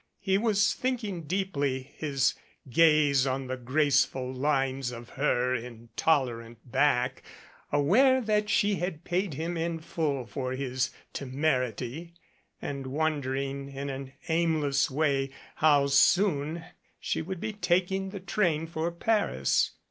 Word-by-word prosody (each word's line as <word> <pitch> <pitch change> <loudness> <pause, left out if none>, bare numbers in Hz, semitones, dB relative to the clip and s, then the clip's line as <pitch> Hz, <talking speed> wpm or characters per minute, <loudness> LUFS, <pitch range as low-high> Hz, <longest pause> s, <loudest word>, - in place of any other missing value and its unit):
He 195 -1 +1
was 205 -3 +3
thinking 220 -10 -3
deeply, 145 -7 -2
his 140 -4 +1 0.3
gaze 145 -1 +4
on 135 +1 -1
the 130 0 -3
graceful 130 0 +1
lines 135 -1 0
of 120 0 -9
her 125 -2 +1
intolerant 115 0 -1
back, 125 -2 +2 0.5
aware 220 - +4
that 210 -3 0
she 205 -1 +2
had 175 -2 -4
paid 180 -3 -1
him 165 +4 -3
in 165 0 -1
full 150 -5 -2
for 130 +1 -4
his 130 -1 -1 0.2
temerity, 135 +2 -2 0.4
and 140 -2 -5
wondering 140 -2 -2
in 140 0 -5
an 135 0 -7
aimless 160 -4 +1
way 140 -1 +1 0.3
how 145 -2 +5
soon 155 +2 +3 0.3
she - - -2
would 185 +2 -5
be 215 - -3
taking 190 0 0
the 200 0 -6
train 180 -4 0
for 165 0 -2
Paris. 170 - +1
145 Hz, 125 wpm, -28 LUFS, 130-170 Hz, 0.5 s, how